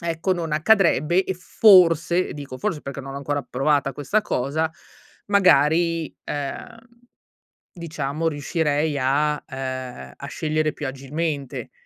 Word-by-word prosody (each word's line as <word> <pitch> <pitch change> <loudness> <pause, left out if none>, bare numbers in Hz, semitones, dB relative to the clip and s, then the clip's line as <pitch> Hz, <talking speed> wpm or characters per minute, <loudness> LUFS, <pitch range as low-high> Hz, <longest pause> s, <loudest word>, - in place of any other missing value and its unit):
ecco, 170 +3 0
non 165 -3 -3
accadrebbe 175 0 +3
e 190 - -3
forse 180 -2 +4
e - - -7
dico 140 -3 -8
forse, 190 -8 -2
perché 140 0 -6
non 135 0 -8
ho - - -5
ancora 145 0 -2
provata 135 +1 +1
questa 150 +11 0
cosa, 155 +1 -1 0.6
magari, 165 -4 +3
ehm, 145 - -5 1.0
diciamo 160 -2 -3
riuscirei 150 0 -1
a 150 +3 +1
ehm, 130 - -6
a - - -8
scegliere 155 0 -1
più 145 - -5
agilmente. 140 +1 -4
150 Hz, 125 wpm, -23 LUFS, 140-170 Hz, 1.0 s, forse